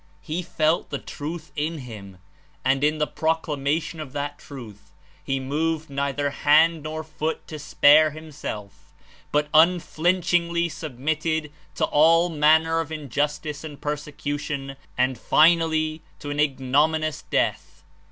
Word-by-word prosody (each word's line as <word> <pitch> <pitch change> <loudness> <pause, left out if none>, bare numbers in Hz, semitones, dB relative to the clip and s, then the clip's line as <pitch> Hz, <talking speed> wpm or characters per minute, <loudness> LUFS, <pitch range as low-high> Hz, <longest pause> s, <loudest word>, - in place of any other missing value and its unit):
"He 165 +2 -3
felt 160 -1 0
the 140 - -2
Truth 155 +4 -7
in 155 +2 -2
him, 105 -8 -10 0.5
and 135 +1 +2
in 155 +1 +2
the 150 - +1
proclamation 155 0 -1
of 150 -4 -7
that 145 0 -4
Truth, 115 -8 -11 0.3
he 135 0 -1
moved 155 +3 -2
neither 140 +1 -1
hand 155 +3 +4
nor 155 +1 -5
foot 155 0 -4
to 155 - -6
spare 150 +1 +5
himself, 150 -10 -8 0.4
but 150 0 +2
unflinchingly 170 +1 +2
sub 155 -6 -8
mitted 155 +2 -1 0.2
to - - +2
all 165 +3 +4
manner 160 +1 +3
of 160 -1 -4
injustice 145 0 -3
and 150 -3 -8
persecution, 145 -2 -4 0.2
and 130 0 +1
finally, 160 -1 +3 0.2
to 145 - -6
an 145 - -3
ignominous 150 +3 +1
death." - - -1
155 Hz, 130 wpm, -24 LUFS, 145-160 Hz, 0.5 s, spare